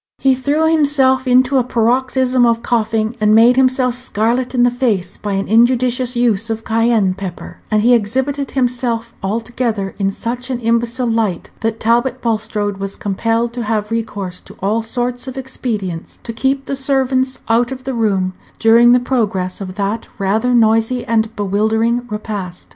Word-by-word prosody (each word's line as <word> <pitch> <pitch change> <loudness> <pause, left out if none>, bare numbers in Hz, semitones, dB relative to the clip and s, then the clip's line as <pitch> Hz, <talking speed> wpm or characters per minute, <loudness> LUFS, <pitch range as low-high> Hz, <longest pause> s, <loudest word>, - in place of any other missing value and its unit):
He 270 -1 +3
threw 285 +5 +1
himself 280 -4 +2
into 255 +2 +4
a - - +1
paroxysm 255 +2 +1
of 235 -1 +2
coughing, 225 -1 0
and 215 0 +4
made 235 +3 +6
himself 255 -1 +2
scarlet 245 +1 -1
in 245 - +3
the 245 - +4
face 220 -8 -1
by 205 -1 -4
an 195 0 -2
injudicious 245 +2 +2
use 230 -3 +1
of 225 0 -3
Cayenne 225 -4 +2
pepper; 185 -2 -8
and 215 -1 +2
he 245 +2 +5
exhibited 265 +5 0
himself 240 -3 -1
altogether 225 -1 -2
in 195 -1 +1
such 245 +5 -4
an 255 -2 -2
imbecile 235 +2 0
light, 225 -6 -1
that 225 0 -2
Talbot 240 +3 +1
Bulstrode 215 -3 -2
was 195 0 -5
compelled 230 +4 -1
to 245 - -4
have 215 -1 -2
recourse 200 -5 -4
to - - -15
all 210 +4 0
sorts 245 +2 -3
of 260 0 -7
expedients 215 -10 -4
to 230 - -6
keep 270 +3 -1
the 275 - -3
servants 265 -1 +1
out 235 +2 +2
of 260 -1 -7
the 265 0 -3
room 195 -5 0 0.2
during 235 +2 +5
the 250 - +5
progress 210 -8 -2
of 185 -1 -6
that 205 +2 -2
rather 220 +6 +1
noisy 225 +2 +2
and 225 0 0
bewildering 220 +4 0
repast. 205 -4 -6
230 Hz, 165 wpm, -17 LUFS, 215-250 Hz, 0.2 s, made